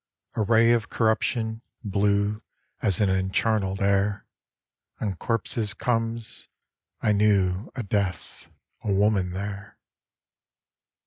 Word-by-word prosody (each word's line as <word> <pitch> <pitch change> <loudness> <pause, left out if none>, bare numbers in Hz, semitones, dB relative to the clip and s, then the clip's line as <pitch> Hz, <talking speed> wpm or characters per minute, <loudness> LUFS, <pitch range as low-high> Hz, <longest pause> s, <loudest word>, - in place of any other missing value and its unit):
A - - -1
ray 115 +2 +4
of 115 -2 +1
corruption, 110 0 0 0.2
blue 100 +1 +1 0.4
As 100 -5 +2
in 105 - +3
encharnel'd 95 +1 +1
air 100 +1 +1 0.7
On 100 -4 -2
corpses 115 +1 -1
comes. 115 0 -2 0.5
I 105 - +3
knew 100 -1 +2
A 125 - -3
Death, 100 -2 -3 0.4
a 105 - -1
Woman 100 -1 +2
there. 100 +2 -6
105 Hz, 105 wpm, -26 LUFS, 100-110 Hz, 0.7 s, ray